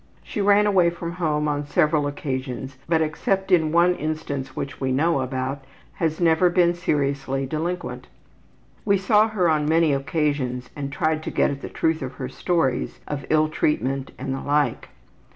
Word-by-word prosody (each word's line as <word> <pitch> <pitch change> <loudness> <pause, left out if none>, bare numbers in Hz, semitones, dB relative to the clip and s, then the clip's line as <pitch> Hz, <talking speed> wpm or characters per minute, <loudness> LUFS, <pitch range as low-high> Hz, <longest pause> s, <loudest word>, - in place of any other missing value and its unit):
She 210 - -4
ran 205 +1 +5
away 190 -4 +4
from 170 0 -5
home 155 -4 -1
on 145 -1 -1
several 150 -1 +2
occasions, 130 -2 -4
but 160 -1 +3
except 190 +5 -1
in 160 -4 +4
one 170 +2 +4
instance 155 -4 -4
which 140 - -5
we 130 -1 0
know 150 +2 +2
about, 130 +1 -3 0.3
has 160 -2 -1
never 170 +1 +4
been 175 -1 +3
seriously 140 -5 -1
delinquent. 165 +6 -4 0.8
We 200 -1 +3
saw 210 +3 +4
her 205 -5 +1
on 155 -2 +2
many 160 -2 +3
occasions 140 -3 -1
and 140 -2 -4
tried 155 +2 0
to - - -4
get - - +2
at 140 -1 -6
the - - -6
truth 160 0 0
of 130 -1 -5
her 130 -1 -6
stories 135 -3 -1
of 145 -2 -5
ill 155 0 +4
treatment 135 -3 -1
and 135 - -3
the 135 - -4
like. 145 0 0
155 Hz, 170 wpm, -23 LUFS, 135-170 Hz, 0.8 s, ran